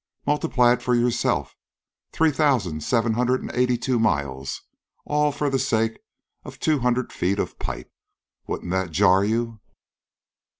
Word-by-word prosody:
Multiply 125 -4 +3
it 125 - -3
for 125 -1 +1
yourself. 120 0 0 0.6
Three 160 -1 +2
thousan', 125 - +1
seven 115 +6 +1
hundred 125 +2 +1
an' - - -5
eighty 125 0 +2
two 125 0 0
miles 70 -10 -1 0.4
all 150 0 +1
for 145 +1 -2
the 135 -1 +1
sake 115 -4 0 0.4
of - - -11
two 155 -2 +1
hundred 125 0 0
feet 95 +3 0
of - - -3
pipe. - - -6 0.5
Wouldn't 90 - -4
that 95 -1 0
jar 95 +3 +4
you?" 115 +1 -1
120 Hz, 145 wpm, -24 LUFS, 100-130 Hz, 0.6 s, jar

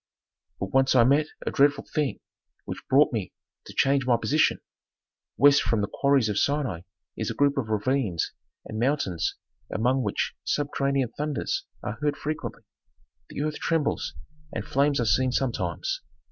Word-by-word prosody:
"But 95 - -4
once 135 0 +4
I 120 - +7
met 140 +5 +4 0.2
a - - -1
dreadful 145 +1 +3
thing 150 -3 -2 0.4
which - - -6
brought - - +5
me - - -3 0.3
to - - -9
change 135 -1 +3
my 120 -2 +4
position. 155 +6 +2 0.8
West 145 0 +6
from 110 0 +1
the 100 - 0
quarries 140 -4 +3
of 105 -1 0
Sinai 140 - 0 0.3
is - - -3
a - - -4
group 140 0 +3
of 135 -6 -1
ravines 110 -4 0 0.3
and 110 - -5
mountains 120 - 0 0.4
among 125 +4 +1
which - - -1
subterranean 140 -3 0
thunders 150 -4 -2 0.2
are 110 - -4
heard 145 -1 0
frequently, 155 +1 -4 0.7
the 145 - -3
earth 150 0 -2
trembles, 165 -3 0 0.4
and 105 - -4
flames 140 0 +2
are 120 - +1
seen 125 +5 +3
sometimes. 135 - -1
135 Hz, 155 wpm, -26 LUFS, 115-145 Hz, 0.8 s, I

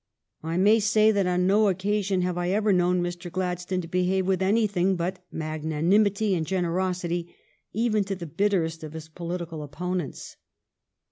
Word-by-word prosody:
I 165 +2 -3
may 210 +4 +5
say 215 +1 +4
that 200 -3 +1
on 180 0 +1
no 205 +3 +4
occasion 195 0 0
have 180 -1 -1
I 175 0 -1
ever 210 +1 +2
known 180 0 +2
Mr. 175 0 -5
Gladstone 180 0 -2
to 165 - -8
behave 180 +2 +1
with 190 -1 +1
anything 195 -2 +2
but 180 +1 -3
magnanim 160 +6 +1
ity 200 0 0
and 170 -3 0
generosity, 175 0 -2 0.4
even 215 -1 +1
to 195 0 -3
the 175 -2 -7
bitterest 165 -2 0
of 155 -1 -7
his 160 -1 -8
politi 170 +2 -5
cal 160 -2 -5
opponents. 175 +1 -5
180 Hz, 165 wpm, -26 LUFS, 170-195 Hz, 0.4 s, may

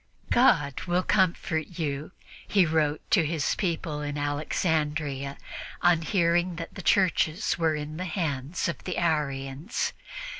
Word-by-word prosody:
"God 145 - +4
will 175 +1 +2
comfort 170 -4 +1
you," 150 -1 -3 0.4
he 195 -3 +4
wrote 155 -2 +1
to 180 - +5
his 155 -1 0
people 165 -5 -2
in 145 0 -3
Alexandria 145 -1 -1 0.5
on 175 -2 +5
hearing 175 +1 +2
that 165 0 -6
the 190 - -7
churches 175 -4 +2
were 160 -2 +2
in 150 +1 -5
the 185 - -3
hands 155 -3 -2
of 170 - -4
the 180 - -3
Arians. 150 - -1
160 Hz, 135 wpm, -27 LUFS, 145-175 Hz, 0.5 s, to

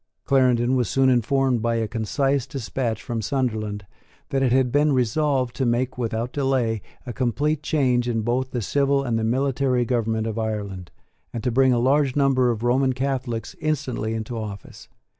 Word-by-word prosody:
Clarendon 125 -2 +3
was 125 -2 0
soon 135 -1 +3
informed, 125 0 +2
by 115 +1 0
a 115 -1 0
concise 135 +5 -1
despatch 120 -3 -3
from 115 -2 -3
Sunderland, 110 -5 -2 0.4
that 135 - 0
it 130 -2 +2
had 130 -1 +3
been 145 +2 +3
resolved 130 0 +1
to - - 0
make 125 +1 0
without 115 0 -3
delay 130 -6 0 0.2
a 120 - -5
complete 145 +5 0
change 125 -6 +1
in 115 -2 0
both 125 +3 0
the 120 -3 -3
civil 140 +3 +1
and 115 -4 0
the - - -2
military 130 +1 +1
government 115 -3 0
of 115 0 -3
Ireland, 100 -5 -4 0.4
and 115 - -5
to 125 - 0
bring 130 +2 +4
a 120 - +3
large 135 +2 +2
number 135 -3 +3
of 115 -1 -2
Roman 130 +2 +2
Catholics 130 -3 -3
instantly 130 -8 -2
into 110 +2 -4
office. 105 -4 -8
125 Hz, 175 wpm, -23 LUFS, 115-135 Hz, 0.4 s, bring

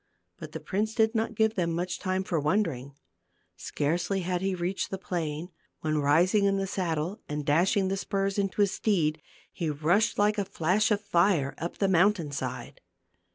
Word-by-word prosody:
But - - -9
the - - -4
prince 215 +3 -2
did 220 -1 +3
not 225 0 -1
give 220 +1 +2
them 170 -5 -1
much 175 +1 -3
time 185 -1 -1
for 170 -4 -1
wondering; 150 -5 -1 0.6
scarcely 175 +6 -1
had 180 0 -1
he 190 -1 0
reached 180 +2 -2
the 195 - -3
plain, 170 -2 -4 0.3
when 155 -1 0
rising 175 +8 +3
in 195 0 +2
the 195 - -1
saddle, 180 -1 -2
and 150 0 -3
dashing 180 +6 +3
the 195 - 0
spurs 195 +1 -1
into 195 +1 0
his 200 -2 +3
steed, 160 -8 0 0.3
he 165 -3 -2
rushed 165 +9 +1
like 210 +1 +2
a 200 - 0
flash 190 +2 +1
of 210 -1 +1
fire 170 -7 +2
up 170 - -4
the 195 - +1
mountain 185 -3 +3
side. - - -5
185 Hz, 180 wpm, -28 LUFS, 160-200 Hz, 0.6 s, did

